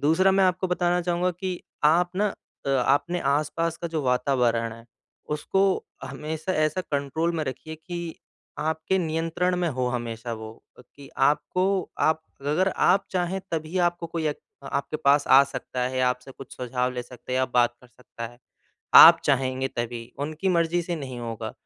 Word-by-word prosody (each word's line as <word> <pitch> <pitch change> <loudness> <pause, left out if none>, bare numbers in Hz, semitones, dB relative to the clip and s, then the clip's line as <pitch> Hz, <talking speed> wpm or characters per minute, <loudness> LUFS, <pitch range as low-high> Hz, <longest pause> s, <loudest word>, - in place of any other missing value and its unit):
दूसरा 165 +6 +4
मैं 195 0 +4
आपको 185 +1 +1
बताना 180 0 +1
चाहूँगा 175 +1 0
कि 180 0 -5 0.2
आप 175 +4 +4
न 205 0 +2 0.4
अ, - - +1
अपने 140 +6 +1 0.2
आसपास 165 +2 -2
का 170 - -5
जो 160 -2 -2
वातावरण 125 -3 +1
है, 115 0 -12 0.4
उसको 150 +6 0 0.4
हमेशा 160 +4 -4
ऐसा 155 +3 +1
कंट्रोल 155 +2 -1
में 155 - -1
रखिए 145 +4 -6
कि 170 +1 -6 0.4
आपके 160 +4 0
नियंत्रण 165 +2 0
में 175 -1 0
हो 130 -3 -1
हमेशा 120 -1 -4
वो 110 0 -8 0.3
कि 140 +2 -15
आपको 180 +5 +2 0.4
आप 160 0 +2 0.2
अगर 150 +7 +1
आप 195 +2 +3
चाहें 185 +1 -1
तभी 160 +2 -2
आपको 175 -1 -2
कोई 165 -1 -3
एक 150 - -4 0.3
आपके 140 +2 -2
पास 140 +1 +4
आ 135 +1 +8
सकता 130 -2 -6
है, 130 0 -2
आपसे 125 +1 0
कुछ 135 - -12
सुझाव 125 0 -1
ले 125 - -4
सकता 125 +1 -13
है - - +1
या 130 - +3
बात 120 -1 +4
कर 125 - -17
सकता 120 -1 -9
है। 120 +1 -15 0.6
आप - - +11
चाहेंगे 130 -1 +1
तभी 120 -1 -5
उनकी 155 +6 -2
मर्ज़ी 170 0 +2
से 170 0 -3
नहीं 130 -4 -6
होगा। 115 -2 -5
155 Hz, 170 wpm, -25 LUFS, 125-175 Hz, 0.6 s, आप